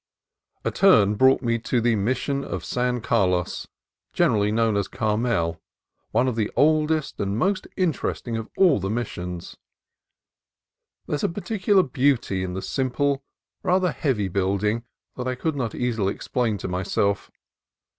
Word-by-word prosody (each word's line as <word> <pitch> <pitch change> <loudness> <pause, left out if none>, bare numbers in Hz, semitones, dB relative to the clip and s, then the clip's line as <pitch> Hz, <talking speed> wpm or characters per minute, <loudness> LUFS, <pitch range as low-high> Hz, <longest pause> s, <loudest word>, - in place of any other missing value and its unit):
A - - +1
turn 110 - +5
brought 130 +6 +4
me 115 -1 +1
to 120 +2 0
the 120 0 +2
Mission 130 +6 -1
of - - -5
San 125 -1 -1
Carlos, 90 -7 0 0.5
generally 105 -1 +2
known 110 -1 +2
as 100 -1 0
Carmel, 105 -7 -1 0.5
one 125 - +2
of 125 - 0
the 110 -2 0
oldest 155 +2 +2
and 100 +1 -1
most 190 - 0
interesting 155 -9 -1
of 115 0 -4
all 180 - +5
the 95 +1 -3
Missions. 90 -6 -4 1.5
There - - -5
is 145 - -1
a - - +2
peculiar 200 +1 +1
beauty 125 - +1
in 90 -1 -4
the 95 - -4
simple, 135 +1 0 0.4
rather 180 -1 +2
heavy 120 -12 0
building 100 +5 0 0.3
that 125 0 -3
I 130 - -1
could 155 +4 -2
not 125 -6 -3
easily 115 -5 0
explain 120 -5 -1
to - - -5
myself. 95 +2 -1
115 Hz, 145 wpm, -24 LUFS, 100-140 Hz, 1.5 s, turn